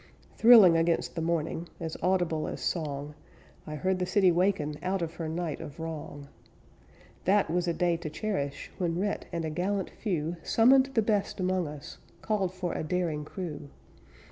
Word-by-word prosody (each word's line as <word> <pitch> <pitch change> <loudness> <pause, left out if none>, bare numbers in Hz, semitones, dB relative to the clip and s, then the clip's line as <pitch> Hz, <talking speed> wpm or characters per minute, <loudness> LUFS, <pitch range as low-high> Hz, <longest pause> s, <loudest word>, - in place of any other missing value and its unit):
Thrilling 220 -7 +8
against 165 0 +1
the 165 - -3
morning, 165 0 -2
As 160 -1 -4
audible 175 -4 +1
as - - -5
song, 150 -3 -3 0.5
I 150 - -5
heard 185 +5 0
the 180 - -1
city 190 -1 +4
waken 170 -4 +1
Out 185 -1 -1
of 165 0 -4
her 165 -2 -3
night 165 -1 -3
of 145 - -9
wrong. 155 -3 -6 1.0
That 195 -3 +3
was 175 +1 0
a 170 - +1
day 175 -1 +1
to 165 -2 -5
cherish 150 -5 -3
When 170 -2 0
Rhett 205 +2 -2
and 170 -2 -2
a 155 - -3
gallant 190 +4 -1
few 170 -5 -2
Summoned 260 +8 +5
the 225 - +4
best 205 -2 0
among 185 -2 0
us; 145 -1 -9 0.2
Called 200 -4 0
for 185 -2 -4
a - - -3
daring 160 -2 -1
crew. 155 -5 -6
175 Hz, 170 wpm, -29 LUFS, 155-190 Hz, 1.0 s, Thrilling